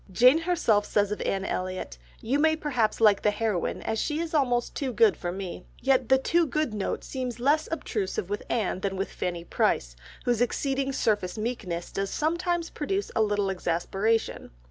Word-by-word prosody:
Jane 250 - +6
herself 325 -12 +2
says 205 0 +1
of 210 - -3
Anne 195 0 -1
Elliot, 185 - -4 0.2
"You 265 +6 0
may 315 +1 +4
perhaps 260 -8 0
like 210 -3 +5
the - - +3
heroine 210 -3 -1
as 220 - -1
she 300 - -1
is 335 0 -3
almost 245 -5 +1
too 270 -3 -2
good 435 - +4
for 175 - -4
me," 185 -1 -6 0.2
yet 265 -2 +2
the 265 - +6
too 335 +5 +2
good 305 -3 -1
note 205 -2 -2
seems 250 -3 -4
less 295 +5 +2
obtrusive 205 - -2
with 205 +1 -3
Anne 215 -5 0
than 195 0 -2
with 195 +1 -3
Fanny 175 -2 -3
Price, - - 0 0.3
whose 240 -2 +1
exceeding 270 +2 0
surface 210 -7 0
meekness 215 -7 -3
does 195 0 -2
sometimes 340 - -1
produce 390 +7 -2
a 225 - +3
little 205 -2 +1
exasperation. 195 +5 -1
225 Hz, 180 wpm, -27 LUFS, 195-285 Hz, 0.3 s, Jane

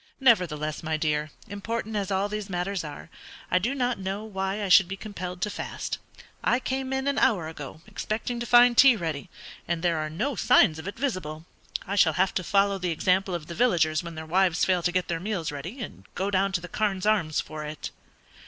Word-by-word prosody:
"Nevertheless, 170 - +2
my 160 -1 -1
dear, 150 -1 0 0.2
important 220 +2 -4
as 200 -2 -1
all 195 +1 +1
these 210 -1 -5
matters 180 0 -2
are, 150 +2 -9 0.4
I 185 - +4
do 240 +9 -1
not 250 -4 0
know 195 +2 -3
why 195 0 -2
I - - -1
should 185 0 +7
be 195 +2 -5
compelled 180 -4 -6
to 210 - 0
fast. - - -4 0.4
I 245 - +3
came 265 +1 -3
in 265 +1 -1
an 280 0 +1
hour 180 -8 +2
ago, 155 -1 -8
expecting 230 +3 -3
to 240 - -4
find 245 +1 +7
tea 265 0 +8
ready, 160 -8 -4 0.4
and 170 0 -2
there 170 -2 +2
are 155 0 -2
no 240 - -2
signs 160 -6 +4
of 160 - -7
it 200 - -6
visible. 175 - -3 0.4
I 200 - -2
shall 160 -5 +5
have 190 +2 +2
to 185 - -1
follow 200 +1 +2
the 180 -1 -1
example 185 +3 +1
of 165 -3 -5
the 170 - -7
villagers 165 -8 +2
when 170 -2 -8
their 160 0 -6
wives 175 +1 +2
fail 185 -2 +2
to 175 - +1
get 185 0 0
their 165 -1 -2
meals 180 -4 -2
ready, 170 - -7
and - - -10
go 195 +2 -1
down 195 0 +2
to 175 - 0
the 180 - -7
'Carne's 195 +1 -1
Arms' 190 -8 +2
for 155 -1 -5
it." 150 0 -6
190 Hz, 220 wpm, -27 LUFS, 165-215 Hz, 0.4 s, tea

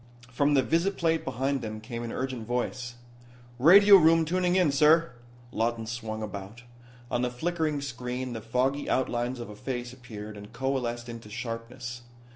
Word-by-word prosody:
From 145 +3 +2
the 135 - +4
visiplate 165 0 +1
behind 135 +3 -1
them 110 -1 -5
came 115 +2 -6
an 120 -1 -5
urgent 130 -4 -4
voice: 125 0 -3 0.6
"Radio 200 +8 +9
room 165 -1 +5
tuning 180 +2 +1
in, 180 -6 +4
sir." 155 +2 +4 0.4
Lawton 115 0 -1
swung 110 -1 -5
about. 105 +3 -7 0.5
On 120 - +1
the 125 - +1
flickering 155 +3 -1
screen 125 -1 -4
the 115 - -5
foggy 130 +5 0
outlines 125 -1 0
of 115 -3 -7
a - - -10
face 120 +1 -5
appeared 110 -4 -9
and 105 0 -11
coalesced 125 -3 -2
into 115 -2 -9
sharpness. 120 +2 -6
125 Hz, 155 wpm, -28 LUFS, 115-145 Hz, 0.6 s, Radio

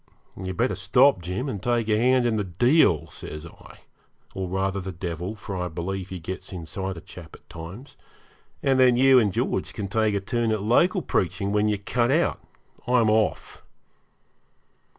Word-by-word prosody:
'You'd 95 -1 -6
better 125 +3 +1
stop, 105 +4 +3
Jim, 90 - -3
and 105 -8 -4
take 120 -1 0
a 110 - +3
hand 125 +2 +3
in 115 -2 +1
the 105 - 0
deal,' 95 - +3
says 75 0 -9
I 85 - -15 0.5
(or, 95 -1 -4
rather, 95 +1 -1
the 95 +1 -5
devil, 90 +3 -5
for 100 -1 -7
I 90 -1 -2
believe 90 +3 -5
he 95 - -5
gets 95 +3 -7
inside 95 +1 -5
a - - -8
chap 80 -1 -12
at - - -20
times), 90 - -10 0.7
'and 135 -1 +3
then 125 -2 +5
you 130 0 +6
and 105 -4 +2
George - - -2
can 100 - -4
take 110 0 +1
a - - +1
turn 115 +3 -1
at 110 -2 -1
local 170 - +3
preaching 100 -2 -1
when 105 +1 +2
you're 105 -1 +1
cut 120 +4 0
out. 160 +5 +1 0.5
I'm 120 -3 +3
off.' 110 0 -1
100 Hz, 180 wpm, -25 LUFS, 90-120 Hz, 0.7 s, you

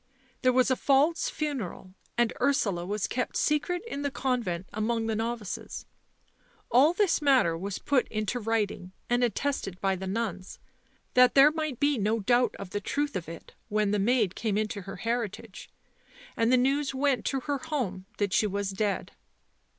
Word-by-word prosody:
There 255 - +4
was 255 +1 +3
a - - +4
false 285 +6 +2
funeral, 250 - -4 0.2
and 240 -1 +2
Ursula 200 -10 +1
was 205 +1 -1
kept 250 +3 -2
secret 325 +5 0
in 285 -11 -5
the 285 - 0
convent 235 -10 -2
among 225 +1 -1
the 225 -1 -1
novices. 225 -2 -4 0.9
All 265 +7 +6
this 380 -3 +2
matter 260 - +4
was 190 +3 -4
put 275 -3 +1
into 215 +3 -2
writing 210 -5 -2 0.2
and 245 +1 +3
attested 235 -5 -1
by 195 -1 +1
the 190 +1 -6
nuns, 190 -3 -3 0.6
that 250 0 +5
there 280 +2 +8
might 310 -5 -3
be 285 -3 +2
no 215 +3 +1
doubt 240 +4 +2
of 195 -2 -8
the 205 - -2
truth 285 +7 -2
of 170 -3 -4
it 165 - -10 0.2
when 210 -1 +1
the 210 - +1
maid 215 -2 +2
came 210 -2 -1
into 215 -1 -2
her 195 +1 -8
heritage. 230 -3 -4 0.7
And 230 +1 +2
the 255 - +6
news 275 +2 +1
went 265 -4 +1
to 270 - -1
her 285 +1 -2
home 245 - -3
that 200 -2 0
she 215 - +3
was 200 0 -2
dead." 200 +1 -2
230 Hz, 175 wpm, -28 LUFS, 200-270 Hz, 0.9 s, there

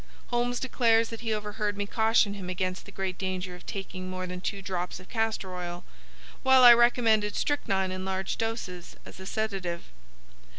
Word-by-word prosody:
Holmes 245 0 0
declares 230 -3 +3
that 230 - -7
he 225 -2 -3
overheard 210 -1 -2
me 205 - -1
caution 220 -1 +3
him 190 -3 -6
against 185 0 -2
the - - -10
great 190 -2 -4
danger 185 -1 -3
of 180 - -12
taking 185 -2 -5
more 185 0 -4
than 180 0 -6
two 200 - -3
drops 180 -1 -3
of 185 - -15
castor 220 -5 -1
oil, 175 -1 -5 0.6
while 265 -1 +6
I 240 -1 +12
recommended 230 -3 +3
strychnine 195 -10 0
in 185 0 -4
large 190 0 -2
doses 225 -6 -4
as - - -12
a 190 - -8
sedative. 195 - -3
200 Hz, 175 wpm, -28 LUFS, 185-225 Hz, 0.6 s, I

